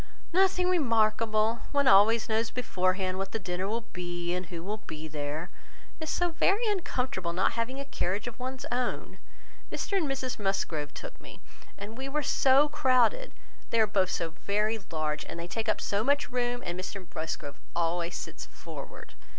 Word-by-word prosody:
"Nothing 370 0 +4
remarkable. 225 -7 +3
One 280 -1 +3
always 215 +4 +6
knows 225 0 +1
beforehand 185 -5 0
what 195 0 -3
the - - +1
dinner 185 -2 -3
will 225 +2 -2
be, 175 -2 -3
and 180 0 -3
who 170 -2 -6
will 210 +3 -3
be 155 0 -5
there; 145 0 -3
and 175 - -8 0.5
it - - -5
is - - -4
so 350 +2 +1
very 395 +7 +3
uncomfortable 250 - -1
not 185 +2 +2
having 235 +4 -2
a 280 - -4
carriage 200 -6 -1
of 240 0 -7
one's 260 +1 -4
own. 245 0 -2 0.5
Mr 400 - -2
and 350 -6 +2
Mrs 260 -3 -2
Musgrove 165 -7 -1
took - - -8
me, - - -11 0.4
and 215 +4 -7
we 270 +1 -3
were 300 +2 0
so 275 +2 +5
crowded! 290 - +3 0.4
They 230 - +2
are 220 - +7
both 195 -3 +2
so 165 -2 -1
very 210 +6 0
large, 155 -2 -1
and 170 0 -5
take 225 -1 -1
up - - +2
so 200 +1 0
much 285 +3 +2
room; 245 0 0
and 175 +1 -3
Mr 185 0 -5
Musgrove 155 -2 -4 0.2
always 170 +1 0
sits - - -6
forward. - - -9
215 Hz, 180 wpm, -30 LUFS, 180-260 Hz, 0.5 s, are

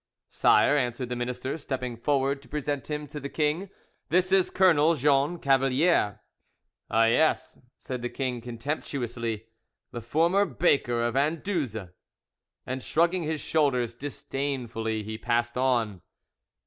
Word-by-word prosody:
"Sire," 145 - +4
answered 125 -2 -1
the 125 - -2
minister, 125 +4 -3
stepping 130 -4 -4
forward 135 +3 0
to 135 - -18
present 145 -3 -3
him 150 0 -3
to 150 +1 -7
the 140 0 -6
king, 155 +6 -1 0.4
"this 185 +3 +2
is 190 -1 +4
Colonel 165 -4 +4
Jean 145 +3 +2
Cavalier." 135 - +2 0.7
"Ah 115 +1 +4
yes," 125 +8 +2 0.2
said 125 -2 -6
the 120 - -3
king 125 -3 -3
contemptuously, 120 -2 -4 0.5
"the 120 - -6
former 165 - +2
baker 120 -10 +1
of 120 +1 -1
Anduze!" 140 - -1 0.7
And 130 +1 -4
shrugging 170 +6 +1
his 155 -1 -2
shoulders 125 -7 +1
disdainfully, 120 -4 -3
he 110 +1 -6
passed 120 0 0
on. 120 -7 0
135 Hz, 130 wpm, -27 LUFS, 120-150 Hz, 0.7 s, Sire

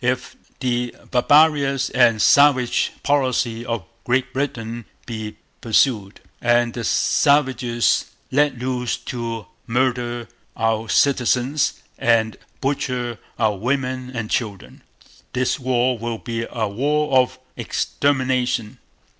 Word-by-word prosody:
If 125 +1 -1 0.3
the 125 -1 -1 0.2
barbarous 140 +1 +3
and 120 -3 +4
Savage 140 -4 +4
policy 130 -5 +1
of 115 -5 -3 0.2
Great 125 +1 0
Britain 120 -4 -3 0.2
be 110 -2 -6 0.2
pursued, 110 -3 +1 0.2
and 120 -1 +2
the 120 - -5
savages 130 -3 +2 0.3
let 145 -1 +2
loose 125 0 -2
to 115 -4 -5 0.2
murder 120 -1 -1 0.3
our 115 -1 0
Citizens 135 +1 +1 0.2
and 115 -2 +2 0.3
butcher 125 -4 -2 0.2
our 110 -3 +1
women 130 +3 -2
and 120 -4 -5
children, 105 -6 -3 0.5
this 130 +3 0
war 125 -1 +1
will 115 0 -3
be 115 0 -4
a 110 -3 -2
war 145 +7 0
of 130 0 0 0.2
extermination. 130 -5 -1
125 Hz, 105 wpm, -21 LUFS, 115-130 Hz, 0.5 s, and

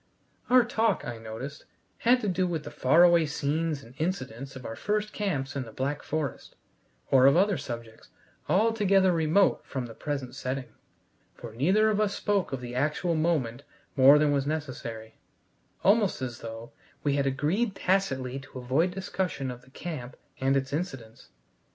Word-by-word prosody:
Our 250 0 +7
talk, 225 -3 +1
I 120 -2 -5
noticed, 115 +6 -7 0.3
had 245 +2 +4
to 210 - -2
do 185 -1 +1
with 165 -3 -3
the - - -8
far 155 +7 +4
away 170 -2 +5
scenes 150 0 -1
and 115 - -15
incidents 135 - -3
of 130 -2 -9
our 115 - -5
first 210 - -1
camps 145 -11 -2
in 140 - -1
the 115 -3 -8
Black 140 +5 -2
Forest, 155 -4 -4 0.6
or 130 0 +7
of 140 - +5
other 200 +2 +3
subjects 115 -6 -7 0.4
altogether 200 -2 +3
remote 165 +3 +3
from 130 -3 -4
the 115 - -9
present 135 -1 -4
setting, 130 0 -4 0.6
for 115 -2 -9
neither 190 - +3
of 210 0 +1
us 205 -1 0
spoke 200 -3 0
of 135 -2 -3
the 120 -1 -7
actual 150 +6 0
moment 155 -7 0 0.3
more 135 +1 +8
than 150 0 +3
was 140 -1 0
necessary 120 -7 -5 0.6
almost 205 0 +3
as 125 -2 -5
though 115 0 -8 0.3
we 145 - +2
had 140 -1 +1
agreed 170 - 0
tacitly 135 -10 0
to 135 -1 -12
avoid 130 +8 +1
discussion 180 -7 -3
of 125 0 -9
the 130 - -20
camp 135 -3 -7 0.2
and 135 +1 +2
its 135 +1 -3
incidents. 135 -9 -5
145 Hz, 170 wpm, -28 LUFS, 130-185 Hz, 0.6 s, more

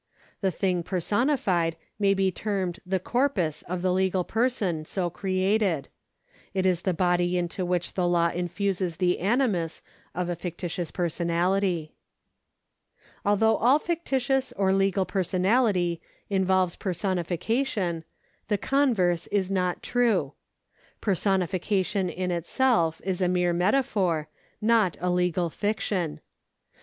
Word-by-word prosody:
The 195 - +2
thing 180 0 0
personified 185 - +1 0.2
may 200 -1 +3
be 190 -1 +2
termed 190 -2 -2
the 190 0 +1
corpus 205 - 0
of 180 0 -5
the 185 -1 +2
legal 185 0 +1
person 220 -8 0
so 175 +2 -2
created; 190 -4 0 0.7
it 190 -1 +1
is 180 -2 +2
the 190 - 0
body 175 0 +2
into 175 +1 -2
which 175 -1 -1
the 180 -2 +1
law 170 -1 +3
infuses 180 0 -2
the 180 -1 +1
animus 195 -5 0 0.3
of 180 0 -1
a 175 - -2
fictitious 175 0 -4
personality. 175 0 0 1.3
Although 215 +2 +3
all 250 +6 +5
fictitious 270 -6 -1
or 190 -1 +2
legal 195 0 +2
personality 185 -1 +1 0.3
involves 185 -2 +2
per 190 -3 -3
sonification, 185 +1 -1 0.5
the 210 - +1
converse 205 - +1
is 195 -2 0
not 180 -2 -1
true. 220 - +1 0.7
Personification 190 0 0
in 180 +1 -3
itself 170 0 +1
is 190 -1 -2
a 180 - +3
mere 180 -1 +2
metaphor, 180 - +1 0.3
not 215 -5 +3
a 180 +1 0
legal 180 -1 +1
fiction. 185 -7 -2
185 Hz, 120 wpm, -26 LUFS, 175-205 Hz, 1.3 s, all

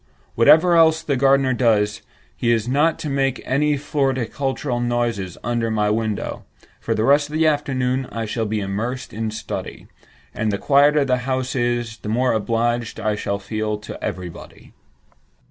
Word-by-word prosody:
whatever 160 +9 +5
else 160 -1 +4
the 140 - 0
gardener 135 0 +3
does, 105 -4 +1 0.3
he 120 - 0
is 115 -1 +1
not 150 +5 +2
to - - -5
make 135 -2 0
any 150 +3 +1
floricultural 135 -2 -1
noises 120 -7 -1
under 115 0 -1
my 105 -1 +1
window. 110 -1 -2 0.4
For - - -2
the 110 - 0
rest 145 +3 +3
of - - -10
the 160 +1 +2
afternoon 130 -4 0
I 115 -1 -3
shall 110 +1 -2
be 105 0 -2
immersed 110 +6 -4
in 110 0 -2
study—and 110 0 -6
the 100 - -1
quieter 145 +3 +4
the 130 -1 +2
house 130 +1 -2
is, 120 -2 -1
the 105 - -6
more 125 +3 +1
obliged 115 +1 -1
I 110 - 0
shall 100 -1 -2
feel 105 +1 -3
to 105 - -9
everybody." 90 -2 -7
120 Hz, 160 wpm, -21 LUFS, 110-135 Hz, 0.4 s, whatever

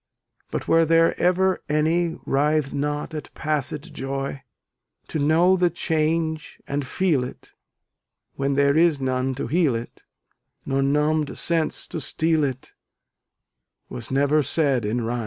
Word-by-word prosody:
But - - -4
were 165 0 +5
there 165 +1 +4
ever 185 +1 +2
any 160 +3 +1
Writh'd 145 0 +1
not 145 +2 -2
at 155 - -6
passed 150 -1 -2
joy? 135 0 -4 0.7
To 155 - -2
know 165 +6 +4
the 180 -1 +2
change 160 -1 -1
and 140 -1 -2
feel 160 -5 +1
it, 125 - -9 0.8
When 140 0 -1
there 140 0 +3
is 160 -2 +4
none 130 0 -1
to 135 - -3
heal 155 -2 +2
it, 115 +1 -7 0.6
Nor 135 0 0
numbed 150 +2 +1
sense 165 -2 -1
to 165 - -6
steal 160 +4 +1
it, 130 -2 -4 1.2
Was 120 -3 -7
never 145 +3 +3
said 140 -4 +1
in 115 +4 -1
rhyme. 120 +2 -2
150 Hz, 140 wpm, -23 LUFS, 135-160 Hz, 1.2 s, were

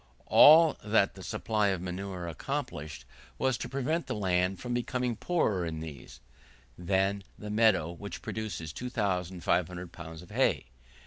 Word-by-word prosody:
All 160 +1 +8
that 105 -2 +2
the 95 - -12
supply 110 +1 0
of 95 -2 0
manure 90 0 -5
accomplished, 75 -2 -5 0.3
was 130 -1 +1
to - - -5
prevent 145 +5 -1
the - - -2
land 95 -2 +1
from 125 -1 -4
becoming 125 0 -1
poorer 105 - 0
in 80 -2 -4
these, 80 -4 -9 0.5
than 95 +4 0
the 105 0 -7
meadow 105 -7 +3
which 100 +4 -8
produces 90 -8 -5
2,500 90 -6 -1
pounds 80 0 -9
of 90 - -16
hay. - - +1
95 Hz, 140 wpm, -30 LUFS, 85-110 Hz, 0.5 s, All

